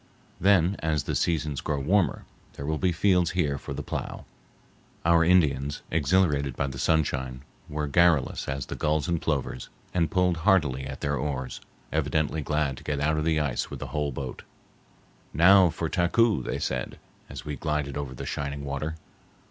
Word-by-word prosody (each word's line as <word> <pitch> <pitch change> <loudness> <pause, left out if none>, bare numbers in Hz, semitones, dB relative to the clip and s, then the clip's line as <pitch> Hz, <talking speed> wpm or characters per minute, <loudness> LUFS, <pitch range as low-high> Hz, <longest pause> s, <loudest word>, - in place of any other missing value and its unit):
Then, 95 0 +4
as 75 -3 0
the - - -3
seasons 75 -4 0
grow 75 -2 -1
warmer, 85 +1 +1 0.3
there 70 - -7
will 80 +1 -1
be 90 -1 +2
fields 90 0 +2
here 70 -6 +1
for - - -8
the 70 - -4
plough. - - -5 0.8
Our 85 0 +5
Indians, 75 -5 +2
exhilarated 75 -4 +2
by 70 - 0
the 65 -1 -5
sunshine, 65 -5 0 0.3
were 75 0 -2
garrulous 80 0 +2
as 65 -1 -3
the - - -6
gulls 75 -1 0
and 85 -2 0
plovers, 70 -4 -2 0.2
and 85 -3 +1
pulled 90 0 +2
heartily 80 -8 +2
at 65 0 -7
their 70 0 0
oars, 65 -1 -3 0.3
evidently 80 0 0
glad 75 -2 -1
to - - -11
get 75 -1 -2
out 75 +2 +1
of 75 - -1
the 80 -1 +2
ice 75 -4 -1
with - - -7
a - - -6
whole 75 -2 0
boat. 65 -1 -6 0.9
"Now 90 +3 +7
for 80 +1 -3
Taku," 100 - +2
they - - -3
said, 65 -1 -3 0.3
as - - -8
we 75 - -3
glided 75 -1 -2
over 70 -3 -4
the - - -6
shining 70 0 -4
water. 70 +3 -3
75 Hz, 175 wpm, -27 LUFS, 70-85 Hz, 0.9 s, Now